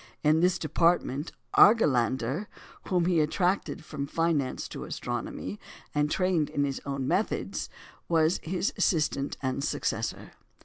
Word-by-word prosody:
In 155 Hz, +1 st, +4 dB
this 180 Hz, +1 st, +3 dB
department 160 Hz, -2 st, +1 dB, 0.2 s
Argelander, 135 Hz, -, +4 dB, 0.4 s
whom 180 Hz, -2 st, +2 dB
he 175 Hz, -2 st, +3 dB
attracted 175 Hz, +1 st, 0 dB
from 140 Hz, -3 st, -4 dB
finance 160 Hz, -5 st, 0 dB
to -, -, -6 dB
astronomy, 100 Hz, +3 st, -5 dB, 0.3 s
and 150 Hz, 0 st, +1 dB
trained 180 Hz, -3 st, +1 dB
in 145 Hz, -, 0 dB
his 140 Hz, -1 st, -2 dB
own 135 Hz, -2 st, -2 dB
methods, -, -, -1 dB, 0.4 s
was 165 Hz, +1 st, +3 dB
his 185 Hz, +4 st, -1 dB
assistant 150 Hz, -4 st, +1 dB
and 130 Hz, +1 st, -1 dB
successor. -, -, -2 dB
155 Hz, 125 wpm, -28 LUFS, 140-175 Hz, 0.4 s, In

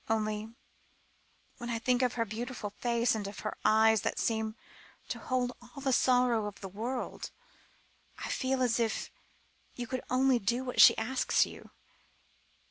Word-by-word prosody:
Only 215 Hz, 0 st, -1 dB, 1.1 s
when 240 Hz, 0 st, -5 dB
I 235 Hz, -, -1 dB
think 245 Hz, +2 st, +1 dB
of 250 Hz, -2 st, +2 dB
her 230 Hz, -1 st, 0 dB
beautiful 225 Hz, 0 st, -5 dB
face, 235 Hz, -1 st, +2 dB
and 210 Hz, -3 st, -3 dB
of 200 Hz, -, -8 dB
her 215 Hz, -, -4 dB
eyes 220 Hz, 0 st, +5 dB
that -, -, -2 dB
seemed 220 Hz, -1 st, -1 dB, 0.5 s
to -, -, -3 dB
hold 250 Hz, -1 st, -1 dB
all 245 Hz, +3 st, -12 dB
the 270 Hz, -1 st, 0 dB
sorrow 245 Hz, -4 st, +3 dB
in 205 Hz, -, -5 dB
the 195 Hz, -, -6 dB
world, 230 Hz, +7 st, -4 dB, 0.9 s
I -, -, -5 dB
feel 260 Hz, 0 st, 0 dB
as 240 Hz, -1 st, +1 dB
if 225 Hz, -2 st, -1 dB, 0.6 s
you 245 Hz, -, -4 dB
could 255 Hz, +1 st, -3 dB
only 255 Hz, 0 st, +3 dB
do 240 Hz, +5 st, 0 dB
what 250 Hz, -1 st, +2 dB
she -, -, +9 dB
asked 250 Hz, +4 st, +2 dB
you." -, -, -11 dB
235 Hz, 160 wpm, -31 LUFS, 220-250 Hz, 1.1 s, she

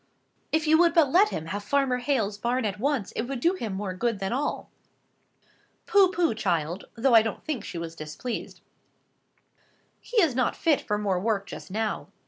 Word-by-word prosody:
"If 315 Hz, 0 st, +1 dB
you 315 Hz, +1 st, +5 dB
would 340 Hz, -1 st, +4 dB
but 305 Hz, -5 st, +4 dB
let 400 Hz, +6 st, +5 dB
him 160 Hz, -, -4 dB
have 205 Hz, +5 st, -4 dB
Farmer 270 Hz, +2 st, +1 dB
Hale's 245 Hz, -6 st, 0 dB
barn 240 Hz, +3 st, -1 dB
at 205 Hz, -1 st, -3 dB
once, 265 Hz, -5 st, -1 dB
it -, -, -3 dB
would 270 Hz, -1 st, -4 dB
do 340 Hz, +8 st, +3 dB
him 230 Hz, -, -4 dB
more 190 Hz, -1 st, -3 dB
good 230 Hz, +4 st, -1 dB
than 195 Hz, +3 st, -3 dB
all." 280 Hz, +4 st, -3 dB, 1.1 s
"Pooh, 400 Hz, -5 st, +5 dB
pooh, 345 Hz, -7 st, +1 dB
child!" 175 Hz, -4 st, -1 dB
though 245 Hz, +2 st, +2 dB
I 225 Hz, -, +9 dB
don't 225 Hz, -1 st, -5 dB
think 275 Hz, -9 st, -3 dB
she -, -, -7 dB
was 165 Hz, 0 st, -6 dB
displeased, 155 Hz, +11 st, -6 dB, 1.4 s
"he 485 Hz, -, -1 dB
is 330 Hz, -9 st, +3 dB
not 250 Hz, -1 st, 0 dB
fit 315 Hz, -4 st, +2 dB
for 210 Hz, -, -1 dB
more 200 Hz, -3 st, 0 dB
work 205 Hz, 0 st, 0 dB
just -, -, -9 dB
now. 215 Hz, +3 st, -2 dB
235 Hz, 190 wpm, -26 LUFS, 200-290 Hz, 1.4 s, I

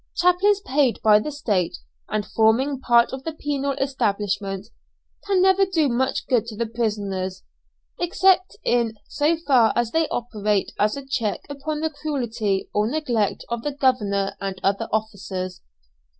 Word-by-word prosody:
Chaplains 380 Hz, +3 st, +3 dB
paid 275 Hz, -, +1 dB
by 210 Hz, -1 st, +6 dB
the 300 Hz, -, -4 dB
State, 210 Hz, -, -1 dB, 0.3 s
and 210 Hz, -1 st, -1 dB
forming 250 Hz, +5 st, +2 dB
part 240 Hz, -2 st, +3 dB
of 265 Hz, 0 st, -5 dB
the 325 Hz, -, -4 dB
penal 280 Hz, -2 st, -2 dB
establishment, 205 Hz, -6 st, -2 dB, 0.6 s
can 385 Hz, -2 st, +3 dB
never 380 Hz, +1 st, +5 dB
do 345 Hz, -6 st, +2 dB
much 255 Hz, +2 st, 0 dB
good 240 Hz, -4 st, +1 dB
to 215 Hz, -3 st, -7 dB
the 235 Hz, -, 0 dB
prisoners, 200 Hz, -5 st, -3 dB, 0.6 s
except 370 Hz, +2 st, +2 dB
in 235 Hz, -2 st, +1 dB
so 305 Hz, +3 st, +1 dB
far 260 Hz, -8 st, +4 dB
as 240 Hz, -1 st, 0 dB
they 325 Hz, -1 st, +2 dB
operate 210 Hz, -4 st, -1 dB
as 210 Hz, +5 st, +2 dB
a 275 Hz, -, -7 dB
check 230 Hz, -6 st, -1 dB
upon 300 Hz, +2 st, -4 dB
the 320 Hz, 0 st, -1 dB
cruelty 235 Hz, -10 st, -2 dB
or 210 Hz, +1 st, +1 dB
neglect 245 Hz, -8 st, -1 dB
of 235 Hz, -1 st, -2 dB
the 290 Hz, +3 st, -3 dB
governor 205 Hz, -8 st, +1 dB
and 195 Hz, -1 st, -4 dB
other 195 Hz, 0 st, 0 dB
officers. 195 Hz, -4 st, -3 dB
235 Hz, 150 wpm, -23 LUFS, 210-290 Hz, 0.6 s, by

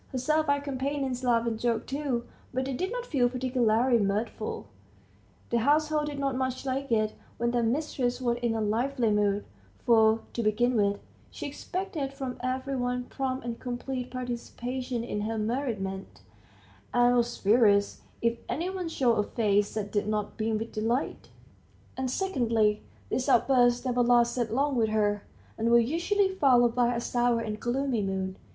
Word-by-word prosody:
Her 260 Hz, -, -5 dB
servile 285 Hz, +1 st, +1 dB
companions 270 Hz, -2 st, -2 dB
laughed 235 Hz, -2 st, +2 dB
and 225 Hz, -1 st, -2 dB
joked 235 Hz, -1 st, 0 dB
too, 270 Hz, -4 st, -2 dB, 0.3 s
but 260 Hz, +1 st, -1 dB
they 270 Hz, -, -3 dB
did 370 Hz, -, -2 dB
not -, -, -3 dB
feel 255 Hz, -, +2 dB
particularly 245 Hz, -1 st, +2 dB
mirthful; 205 Hz, +3 st, -2 dB, 0.9 s
the 235 Hz, -, +3 dB
household 300 Hz, +4 st, +2 dB
did 290 Hz, -1 st, -5 dB
not 275 Hz, -2 st, -1 dB
much 260 Hz, 0 st, -2 dB
like 270 Hz, 0 st, -2 dB
it, 215 Hz, -1 st, +2 dB, 0.2 s
when 235 Hz, 0 st, 0 dB
their 240 Hz, 0 st, +1 dB
mistress 245 Hz, 0 st, 0 dB
was 240 Hz, -2 st, 0 dB
in 235 Hz, -2 st, 0 dB
a 220 Hz, -, -1 dB
lively 230 Hz, +2 st, +1 dB
mood, 205 Hz, -1 st, +1 dB, 0.4 s
for, 220 Hz, -1 st, +5 dB
to 235 Hz, -, -1 dB
begin 235 Hz, +3 st, +2 dB
with, 200 Hz, -2 st, +2 dB, 0.3 s
she -, -, -7 dB
expected 305 Hz, -1 st, -4 dB
from 265 Hz, -2 st, -5 dB
every 260 Hz, +2 st, -2 dB
one 250 Hz, 0 st, -1 dB
prompt 260 Hz, 0 st, -3 dB
and 235 Hz, -1 st, -4 dB
complete 250 Hz, 0 st, -4 dB
participation 250 Hz, 0 st, -4 dB
in 210 Hz, -3 st, -3 dB
her 220 Hz, +2 st, -2 dB
merriment, 215 Hz, -5 st, -3 dB, 0.7 s
and 245 Hz, 0 st, +4 dB
was 240 Hz, 0 st, +1 dB
furious 205 Hz, -1 st, +3 dB, 0.2 s
if 230 Hz, 0 st, +1 dB
any 345 Hz, +5 st, -2 dB
one 365 Hz, -3 st, -4 dB
showed 245 Hz, -8 st, +2 dB
a -, -, +3 dB
face 205 Hz, -1 st, +1 dB
that 205 Hz, -2 st, -3 dB
did 205 Hz, 0 st, 0 dB
not 210 Hz, -1 st, -2 dB
beam 220 Hz, 0 st, 0 dB
with 225 Hz, +1 st, -5 dB
delight; 230 Hz, +5 st, -2 dB, 0.7 s
and 260 Hz, -1 st, -2 dB
secondly, 230 Hz, -, +1 dB, 0.3 s
these 260 Hz, +2 st, -1 dB
outbursts 245 Hz, -1 st, +4 dB
never 245 Hz, -1 st, +1 dB
lasted 240 Hz, -1 st, +3 dB
long 275 Hz, +4 st, +1 dB
with 225 Hz, -3 st, +2 dB
her, 205 Hz, -1 st, +1 dB, 0.4 s
and 225 Hz, +1 st, +1 dB
were 235 Hz, -, +7 dB
usually 345 Hz, -, +2 dB
followed 255 Hz, -10 st, +4 dB
by 245 Hz, 0 st, +2 dB
a -, -, 0 dB
sour 240 Hz, 0 st, +1 dB
and 215 Hz, -2 st, -4 dB
gloomy 250 Hz, -1 st, 0 dB
mood. 190 Hz, -1 st, -2 dB
245 Hz, 165 wpm, -28 LUFS, 225-265 Hz, 0.9 s, were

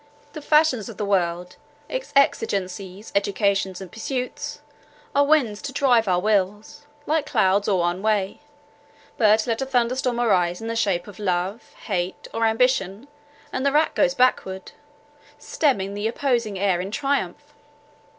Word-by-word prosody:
The 305 Hz, -, -7 dB
fashions 300 Hz, -8 st, +2 dB
of 225 Hz, -, -10 dB
the 210 Hz, -, -2 dB
world, 180 Hz, -2 st, -1 dB, 0.3 s
its -, -, -5 dB
exigencies, 195 Hz, -6 st, 0 dB
educations 200 Hz, -1 st, 0 dB
and 185 Hz, -2 st, -9 dB
pursuits, 250 Hz, +3 st, -4 dB, 0.5 s
are 285 Hz, -, +4 dB
winds 245 Hz, -9 st, +2 dB
to 285 Hz, -, -5 dB
drive 245 Hz, -4 st, +3 dB
our 180 Hz, -1 st, +2 dB
wills, 210 Hz, +6 st, -1 dB, 0.2 s
like 315 Hz, 0 st, 0 dB
clouds 200 Hz, -3 st, +2 dB
all 195 Hz, -, +2 dB
one 175 Hz, +2 st, -1 dB
way; 210 Hz, -2 st, 0 dB, 0.8 s
but 215 Hz, -1 st, +4 dB
let 230 Hz, +1 st, -1 dB
a -, -, 0 dB
thunderstorm 250 Hz, -1 st, 0 dB
arise 180 Hz, -7 st, +2 dB
in 225 Hz, -, -7 dB
the 230 Hz, 0 st, -3 dB
shape 195 Hz, -6 st, 0 dB
of 205 Hz, -2 st, -12 dB
love, 190 Hz, +2 st, -2 dB
hate, 185 Hz, -3 st, -3 dB
or 225 Hz, 0 st, +1 dB
ambition, 225 Hz, 0 st, 0 dB, 0.4 s
and 260 Hz, -, -2 dB
the 280 Hz, -, +2 dB
rack 305 Hz, +2 st, +2 dB
goes 270 Hz, -2 st, +2 dB
backward, 190 Hz, -7 st, 0 dB, 0.7 s
stemming 200 Hz, -10 st, 0 dB
the 205 Hz, +2 st, -2 dB
opposing 235 Hz, -4 st, -1 dB
air 185 Hz, -2 st, +1 dB
in 190 Hz, -, -5 dB
triumph." 275 Hz, +6 st, -2 dB
215 Hz, 150 wpm, -23 LUFS, 190-255 Hz, 0.8 s, are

